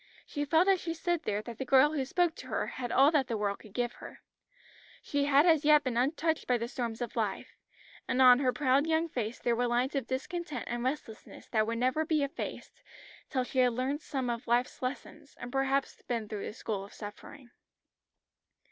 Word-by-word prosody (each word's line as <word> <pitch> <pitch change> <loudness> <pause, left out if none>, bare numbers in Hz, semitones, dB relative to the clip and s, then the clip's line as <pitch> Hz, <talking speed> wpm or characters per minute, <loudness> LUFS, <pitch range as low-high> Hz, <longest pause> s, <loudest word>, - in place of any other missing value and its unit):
She 290 -1 -3
felt 325 +5 +3
as 385 -2 +4
she 330 -1 -3
stood 345 0 -1
there 210 0 -1
that 230 0 -9
the - - -1
girl 265 +3 +5
who 275 -4 -1
spoke 345 +4 +1
to - - -9
her - - -1
had 245 -2 -5
all 275 +3 +5
that 285 -5 +2
the 230 -3 -2
world 205 -1 -1
could 215 - -15
give 245 -1 0
her. - - -12 0.8
She 285 -1 0
had 285 +2 +5
as 320 -4 +4
yet 300 0 +6
been 255 -4 -2
untouched 315 +6 0
by 250 - +3
the 235 0 -3
storms 235 -2 -4
of 240 - -7
life, - - -2 0.5
and 255 - 0
on 250 -1 +8
her 260 -2 +2
proud 275 +2 +2
young 325 +1 +2
face 235 -4 -3
there 240 -1 0
were 245 +1 +1
lines 245 +3 0
of 270 -4 -2
discontent 285 +1 -4
and 240 0 -3
restlessness 255 -5 -5
that 215 -2 +1
would 230 0 -2
never 255 +6 +1
be 310 -2 +1
effaced 280 - -6 0.5
till 260 -3 0
she 260 +1 -3
had 250 -1 +4
learnt 265 +5 -2
some 265 -4 -3
of 235 -1 -3
life's 240 +2 0
lessons, 285 +3 -6
and 245 - -7
perhaps 270 +1 0
been 230 -3 -3
through 205 -2 -5
the - - -6
school 210 -3 -4
of 200 - -13
suffering. 235 +5 -10
260 Hz, 210 wpm, -30 LUFS, 240-295 Hz, 0.8 s, on